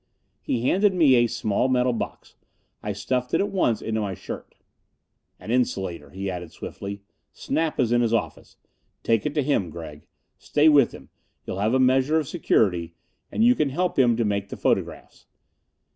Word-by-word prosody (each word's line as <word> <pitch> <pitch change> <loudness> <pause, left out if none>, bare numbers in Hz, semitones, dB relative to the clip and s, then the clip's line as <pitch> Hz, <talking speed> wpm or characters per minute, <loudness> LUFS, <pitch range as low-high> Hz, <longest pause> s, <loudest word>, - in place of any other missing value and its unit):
He 120 - -2
handed 195 +3 +3
me 155 -7 +5
a 120 -1 +4
small 115 0 0
metal 125 -1 +2
box. 115 - -6 0.5
I 105 - -3
stuffed 125 +5 -2
it - - +2
at 200 +1 0
once 120 - +1
into 110 -1 -1
my 100 -2 -3
shirt. - - -9 0.8
"An 110 - -7
insulator," 95 - -1
he 95 +5 -6
added, 90 -3 -5
swiftly. 100 0 -7 0.3
"Snap 160 -1 -2
is 120 -3 +2
in 120 0 +3
his 115 -2 +1
office. 100 -10 -3 0.5
Take 115 +1 +1
it 150 - -5
to 150 - +2
him, 130 - 0
Gregg. 75 -2 -10 0.3
Stay 150 +1 +3
with 140 -5 +5
him - - -13 0.4
you'll 95 - -5
have 110 +5 +1
a - - +3
measure 130 +4 +3
of 155 -3 -1
security 90 - +1 0.4
and 225 - +1
you 245 - +7
can 150 - 0
help 175 +3 -1
him 120 -3 +4
to 115 - +1
make 100 -1 -1
the - - -7
photographs." - - -2
120 Hz, 180 wpm, -24 LUFS, 100-140 Hz, 0.8 s, you